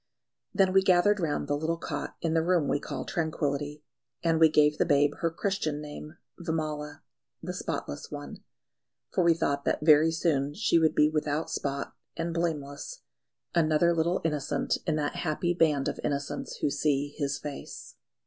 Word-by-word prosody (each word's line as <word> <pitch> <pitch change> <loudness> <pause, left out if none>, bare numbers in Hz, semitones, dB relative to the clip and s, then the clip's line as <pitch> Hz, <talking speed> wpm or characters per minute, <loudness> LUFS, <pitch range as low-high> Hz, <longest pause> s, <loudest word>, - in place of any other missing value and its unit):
Then 190 -2 +3
we 195 - +6
gathered 190 +2 +4
round 150 -4 -1
the 145 - +1
little 160 +3 -1
cot - - -5
in 165 -1 +1
the 165 - +3
room 170 -3 +2
we - - +1
call - - -5
Tranquillity, 150 -2 -2 0.4
and 165 -1 +2
we 160 -1 +7
gave 150 0 +3
the - - +4
babe 145 -1 +4
her 165 - +1
Christian 165 -3 -2
name 150 +2 -9 0.2
Vimala, 155 -3 -3 0.4
the - - -4
Spotless 70 - -4
One; 145 -1 -8 0.7
for 180 - +2
we 170 -1 +5
thought 140 -3 -1
that 150 - 0
very 155 +1 +6
soon 145 -4 0
she 195 -5 +3
would 160 -1 +2
be 150 - +5
without 150 0 -1
spot 140 0 -3 0.2
and 165 0 -2
blameless, 165 - -3 0.5
another 165 0 +3
little 170 +3 +1
innocent 150 -3 0
in 155 - +2
that 150 -1 -2
happy 175 +2 0
band 150 -5 +2
of - - -3
innocents 140 -1 -3
who 145 - +1
see 145 0 0
His 140 -2 -1
Face. 145 -2 -8
155 Hz, 170 wpm, -28 LUFS, 145-165 Hz, 0.7 s, we